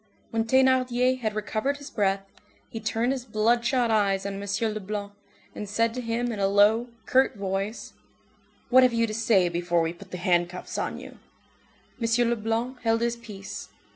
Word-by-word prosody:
When 225 0 0
Thénardier 255 0 +3
had 215 -3 -2
recovered 220 +6 -1
his 285 0 -10
breath, 195 -2 0 0.4
he 225 - -6
turned 225 +3 0
his 265 -2 -3
bloodshot 235 +2 +1
eyes 200 -3 +2
on 200 0 -4
M. 205 +2 -1
Leblanc, 205 0 -5 0.4
and 210 - -6
said 230 +2 +1
to 250 - -4
him 235 +1 -1
in 215 - -5
a 195 - +2
low, 205 +4 +4 0.2
curt 260 0 +3
voice:— 195 +2 -3 0.8
"What 260 +1 +8
have 250 -2 +4
you 230 0 +2
to 215 - -5
say 215 -5 +3
before 175 0 0
we 165 0 -1
put 190 +2 -14
the 180 - -6
handcuffs 175 0 -1
on - - -3
you?" - - -12 0.8
M. 230 +1 +2
Leblanc 235 +2 -2
held 225 0 +1
his 235 0 0
peace. 210 -5 -9
225 Hz, 170 wpm, -26 LUFS, 200-240 Hz, 0.8 s, What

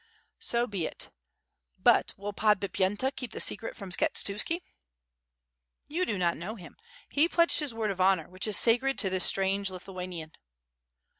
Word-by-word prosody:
"So 235 0 0
be 195 -8 -3
it. - - -8 0.7
But - - +3
will 205 +1 -5
Podbipyenta 205 +4 +1
keep 250 -4 -7
the - - -6
secret 225 - +1
from 195 -3 -9
Skshetuski?" 210 - +1 1.3
"You 350 +5 -1
do 205 - -1
not 175 -2 0
know 200 +6 -6
him, 180 -6 -12 0.3
he 305 +4 +2
pledged 335 -1 +4
his 300 -4 -1
word 220 -2 -1
of 190 -1 -4
honor, 185 -4 +3
which 185 +4 -3
is 210 - +4
sacred 250 +4 +2
to 190 -4 0
this 185 -1 +4
strange 195 +1 +2
Lithuanian." 180 -3 -7
200 Hz, 155 wpm, -29 LUFS, 185-235 Hz, 1.3 s, pledged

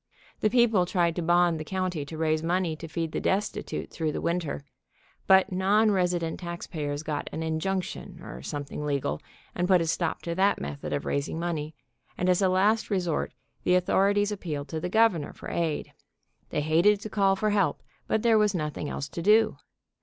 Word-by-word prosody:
The 215 - +2
peo 240 +1 +5
ple 195 -6 +2
tried 170 -3 +1
to 175 - -2
bond 175 -1 +3
the - - -4
county 180 -3 -2
to 155 +2 -8
raise 155 -1 +1
money 170 0 0
to 165 +1 -8
feed 165 0 -3
the - - -2
destitute 200 +2 -2
through 160 -2 -1
the - - -2
winter, 170 -5 -2 0.6
but 190 0 +6
non 205 +4 +3
resident 180 -4 0
tax 170 -1 -5
payers 145 -2 -4
got 150 -2 -3
an 160 - -4
injunction, 170 +4 -3
or 65 - -8
something 145 - -5
legal, 140 - -1 0.3
and 175 - -1
put 185 -1 +5
a 165 - 0
stop 165 0 -1
to 170 - -2
that 195 +3 +2
method 70 0 -5
of - - -2
raising 140 +3 -2
money, 160 -3 -3 0.4
and 180 - +1
as 180 +1 +3
a 190 - +4
last 205 +4 +2
resort 180 -6 0 0.3
the 180 - +3
authorities 200 +3 +2
appealed 155 -8 -4
to 160 - -3
the 180 - -3
Governor 220 -7 +2
for - - -9
aid. 165 -3 -2 0.6
They 150 - -1
hated 170 +7 +4
to 215 - -6
call 195 -2 +3
for 215 +2 0
help, 200 -2 +1 0.2
but 220 - 0
there 225 -2 +5
was 210 -2 +2
noth 150 -3 -3
ing 150 - -3
else 140 - -4
to 170 - -5
do. 215 +5 +4
175 Hz, 200 wpm, -27 LUFS, 155-195 Hz, 0.6 s, but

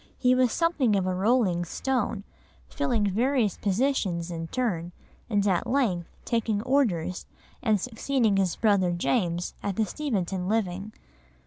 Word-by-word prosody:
He 250 0 +3
was 255 -2 +3
something 305 -10 +2
of 190 -2 +1
a 185 - 0
rolling 190 -3 +2
stone, 220 +2 -2 0.4
filling 200 - 0
various 235 -1 +1
positions 195 -6 0
in 165 -1 -4
turn, 175 -7 -2 0.4
and 205 -2 +1
at 185 -3 +1
length 210 -11 +1 0.2
taking 220 -3 0
Orders 215 - 0 0.3
and 215 -4 +2
succeeding 230 -1 0
his 190 -3 +1
brother 200 -5 +2
James 175 -2 0
in 200 -2 -2
the 220 - +1
Steventon 195 - -2
living. 200 -1 -1
205 Hz, 135 wpm, -27 LUFS, 180-245 Hz, 0.4 s, He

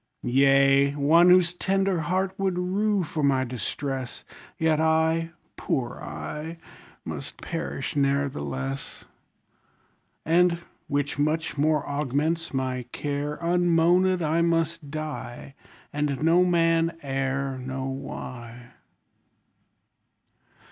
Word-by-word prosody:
Yea, 135 +2 +4
one 160 +5 +5
whose 180 -1 +5
tender 195 0 0
heart 185 +4 0
would 190 -2 0
rue 195 +2 +1
for 155 -1 -4
my 135 -2 +3
distress; 130 +2 -4 0.3
Yet 160 -1 +2
I, 160 +1 +2 0.3
poor 125 -3 -2
I! 160 +3 -6 0.5
must - - -6
perish 165 -5 -4
ne'ertheless. 75 - -2 1.2
And 170 +1 +4 0.3
(which 145 0 -1
much 155 +2 0
more 150 0 +1
augments 150 +4 -1
my 130 -2 -2
care) 145 0 -3
Unmoanèd 175 +1 +3
I 160 +2 +1
must 165 -2 0
die, 150 -4 -6 0.4
And 145 -1 -1
no 170 +3 +5
man 165 -1 +2
e'er 135 0 -2
Know 130 +1 -4
why. 125 -3 -7
150 Hz, 100 wpm, -26 LUFS, 135-170 Hz, 1.2 s, one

